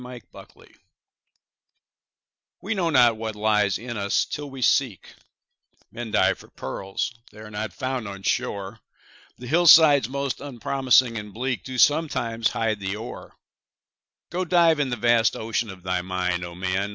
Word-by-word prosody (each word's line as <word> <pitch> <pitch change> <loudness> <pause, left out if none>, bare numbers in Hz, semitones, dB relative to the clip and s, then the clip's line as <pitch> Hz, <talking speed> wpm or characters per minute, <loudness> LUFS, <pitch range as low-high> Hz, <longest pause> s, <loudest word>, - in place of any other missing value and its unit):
HIDDEN 125 -1 -9
GEMS - - -15 1.9
We 205 - -3
know 180 -5 0
not 120 -6 +4
what 110 -1 -5
lies 105 -2 +1
in 120 0 -7
us, 100 -1 0
till 145 -1 -6
we 135 -2 -6
seek; 125 - +1 0.8
Men 120 -1 -6
dive 95 -2 +2
for - - -15
pearls—they 105 - -6
are 105 0 -11
not 105 0 -4
found 130 -4 -4
on 100 -1 -8
shore, 100 +2 -2 0.6
The 125 - -10
hillsides 155 -3 +6
most 140 0 -3
unpromising 130 -2 +1
and 105 0 -9
bleak 125 +3 -3
Do 130 -1 -7
sometimes 120 -5 +2
hide 110 -2 -1
the 95 0 -3
ore. 110 +3 -9 1.0
Go, 180 +2 -1
dive 170 -3 +3
in 140 -3 0
the 120 - -2
vast 120 0 +2
ocean 115 0 -2
of 95 -2 -11
thy 90 -1 -1
mind, 90 -1 -2
O 85 0 -8
man! 95 +2 -2
115 Hz, 150 wpm, -24 LUFS, 100-130 Hz, 1.9 s, hillsides